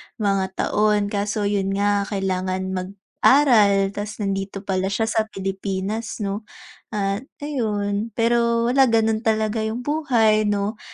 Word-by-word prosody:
mga 195 -3 +1
taon 210 -1 +1
kaso 205 +1 -1
yun 195 -1 0
nga, 200 0 +1
kailangan 185 -2 -2
mag-aral 200 +2 +3
ta's 210 +1 -5
nandito 195 0 -3
pala 190 -1 -1
siya 200 +3 -1
sa 220 0 +1
Pilipinas 195 +2 -4
'no? 205 +2 -4 0.5
At 200 +4 -2 0.2
ayun, 215 -6 -2
pero 235 0 +2
wala 265 0 +5
ganun 225 -1 +2
talaga 220 -1 0
yung 225 +3 -3
buhay 235 -8 +2
'no, 205 +1 -1
205 Hz, 125 wpm, -22 LUFS, 195-225 Hz, 0.5 s, wala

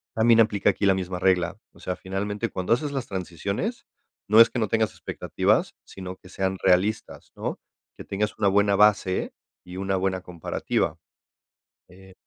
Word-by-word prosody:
también 115 +1 +5
aplica 105 -2 +2
aquí 100 - -2
la 95 - +5
misma 90 -1 -3
regla, 90 -3 +1 0.2
o - - -19
sea, 90 - -3
finalmente, 100 +2 -3
cuando 95 +4 0
haces 145 +4 -1
las 135 -3 -3
transiciones, 100 - -4 0.4
no 110 +2 +6
es - - +7
que 120 - -2
no 110 - +1
tengas 110 0 +1
expectativas, - - -1
sino 95 -1 -8
que 90 - -17
sean 95 0 -2
realistas, 95 +4 +1
¿no?, - - -4 0.4
que - - -8
tengas 105 +2 -3
una 100 - +3
buena 100 +1 +3
base 100 -2 +2 0.3
y 90 +1 -10
una 95 0 -1
buena 95 -1 -1
comparativa, 85 -3 -2 0.9
eh. 95 +1 -16
95 Hz, 165 wpm, -25 LUFS, 95-105 Hz, 0.9 s, es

